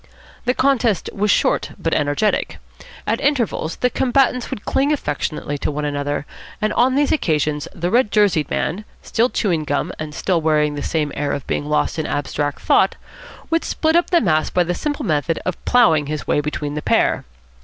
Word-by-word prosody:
The 250 +1 +1
contest 250 -7 +1
was 210 +1 0
short - - +2
but 165 - -1
energetic. 145 +8 0 0.5
At - - 0
intervals 240 - 0
the 250 - 0
combatants 250 -1 +1
would 205 - -6
cling 275 +2 +1
affectionately 145 - -2
to - - -1
one 150 0 -3
another, 145 0 -2 0.3
and 215 0 0
on 255 +2 +3
these 285 0 +2
occasions 150 - 0
the 175 +2 -3
red 240 -1 +3
jerseyed 195 -9 +2
man, 195 +7 -2 0.2
still 235 +3 +1
chewing 175 -11 0
gum 150 +4 -1
and 155 -1 -6
still 180 -4 0
wearing 150 -1 +2
the 145 - -4
same 150 -2 -1
air 145 - -1
of 140 - -4
being - - -2
lost 150 +2 0
in 155 - -2
abstract 145 0 -2
thought, - - +3 0.6
would 330 0 +2
split 320 0 0
up 345 - +3
the 345 - +4
mass 155 -6 +2
by 180 - +2
the 175 +1 -2
simple 290 - -3
method 155 +1 0
of 185 - -3
ploughing 165 -12 +4
his 150 0 -4
way 150 - +1
between 150 0 -3
the 150 - -3
pair. - - +2
165 Hz, 185 wpm, -20 LUFS, 150-240 Hz, 0.6 s, the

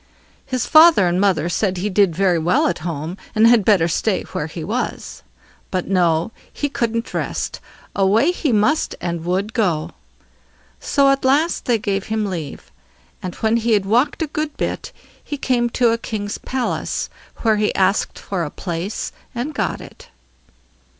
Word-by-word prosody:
His 255 -2 -1
father 315 - +7
and 175 +2 +1
mother 190 -5 +2
said 185 +1 0
he 185 +4 -1
did 195 -4 +2
very 185 -2 +2
well 210 - +2
at - - 0
home, 165 +1 -4 0.2
and 215 +1 +5
had 230 -2 +6
better 190 -5 +4
stay 170 - 0
where - - -3
he - - -7
was. - - -4 0.5
But 185 -1 -2
no, 175 0 +2 0.2
he 290 - -2
couldn't 230 -3 -2
rest; - - -3 0.4
away 210 - +3
he 320 -6 -1
must 235 +9 +2
and 170 -2 -3
would 190 +5 -1
go. 175 -10 0 0.9
So 275 -1 +3
at 275 - 0
last 290 +6 +2
they 240 -2 +2
gave 200 -2 -2
him 220 -1 -1
leave. 165 -8 -6 0.5
And 180 -1 -5
when 220 +1 +1
he 230 0 +1
had 200 -2 +2
walked 245 - +2
a - - 0
good 305 0 -4
bit, - - -3 0.3
he 290 - -5
came 245 -3 +1
to 235 0 +2
a 230 - 0
king's 205 -3 -4
palace, 260 -1 -2 0.4
where 220 -2 +3
he 210 0 0
asked 195 +2 +1
for 185 -4 -3
a 150 - -3
place, 175 +5 -4 0.2
and 255 +6 -3
got - - -2
it. - - -13
210 Hz, 170 wpm, -20 LUFS, 180-245 Hz, 0.9 s, father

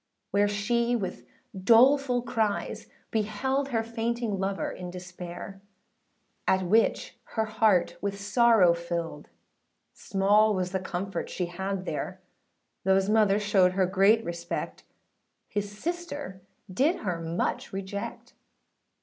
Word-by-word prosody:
Where 205 +1 +3
she 235 +4 +1
with 190 -6 -4 0.3
doleful 245 +5 +4
cries 225 -4 -2 0.2
beheld, 245 +6 0
Her 225 -3 0
fainting 230 -2 -2
lover 195 0 -2
in 180 -1 -7
despair; 180 +1 -8 0.9
At 190 0 +3
which 215 +5 +1 0.2
her 220 -1 +1
heart 210 -6 +2
with 200 0 -3
sorrow 210 -3 +5
filled, 170 -1 -4 0.6
Small 205 +2 +3
was 180 -1 -2
the 190 - -1
comfort 185 0 -4
she 180 - -2
had 190 +2 -4
there; - - -4 0.6
Thoughâs 190 +1 +3
mother 210 -2 +4
showed 200 -3 +3
her 190 0 +2
great 195 +4 +3
respect, 170 0 -5 0.6
His 205 -1 -3
sister 290 - -5 0.3
did 295 - +2
her 175 -3 -2
much 165 +1 -2
reject. 195 +1 -6
200 Hz, 115 wpm, -28 LUFS, 185-225 Hz, 0.9 s, sorrow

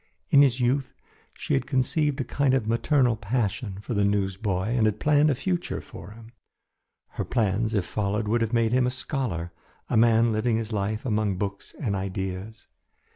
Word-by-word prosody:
In 140 - +7
his 130 -3 +3
youth 130 +2 0 0.4
she - - -3
had 70 - 0
conceived 145 +2 0
a - - +1
kind 135 +1 +1
of 130 - 0
maternal 120 +2 +2
passion 105 -1 -2
for 120 - -5
the 100 -1 +1
newsboy 100 0 0
and 115 -2 +2
had 105 0 -1
planned 150 0 +4
a 140 - +2
future 175 +5 -2
for - - -11
him. 110 +2 -13 0.8
Her - - -4
plans 110 -1 0
if 100 -4 +1
followed 105 +2 -2
would 115 +2 +1
have 115 -1 0
made 115 -2 +2
him 125 0 +3
a - - +2
scholar, 125 - -3 0.4
a - - +3
man 115 0 +4
living 110 +1 +1
his 115 0 -4
life 105 +2 -2
among 105 -5 0
books 100 +1 -5
and 105 -8 -1
ideas. 95 +2 -5
110 Hz, 180 wpm, -26 LUFS, 100-125 Hz, 0.8 s, In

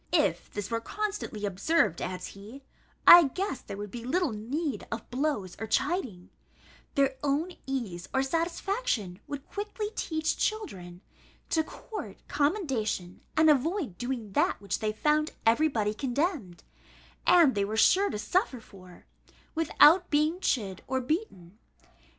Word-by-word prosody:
If - - +2
this 205 +1 -5
were 230 0 0
constantly 405 - -4
observed," 200 - +1
adds 180 0 -4
he, 215 +8 -12 0.4
"I 345 -2 +11
guess 375 +2 -3
there 200 - -8
would 205 -1 -6
be 235 -1 -7
little 320 +4 0
need 245 +4 -3
of 225 0 -5
blows 250 - -1
or 220 - -4
chiding: 220 - -1 0.6
their 275 -1 +2
own 295 +5 0 0.2
ease 215 -10 -4
or 265 0 +1
satisfaction 330 - -1
would 285 0 -6
quickly 420 +1 -4
teach 315 -1 -1
children 185 - -3 0.5
to 320 - +3
court 425 +6 -8
commendation, 265 - -1 0.2
and 315 0 +5
avoid 305 - +1
doing 245 -4 -4
that - - +1
which 200 -1 -3
they 215 -1 0
found 300 +7 +1
every 235 +8 +4
body 215 -7 -1
condemned, 260 - -2 0.6
and 335 -7 +6
they 200 - 0
were 215 +2 -3
sure 385 - +5
to - - -3
suffer 250 - 0
for, 185 -5 -16 0.5
without 330 +2 +5
being 310 +3 +2
chid 200 - -1
or 260 - 0
beaten. 245 - -4
265 Hz, 140 wpm, -29 LUFS, 210-325 Hz, 0.6 s, I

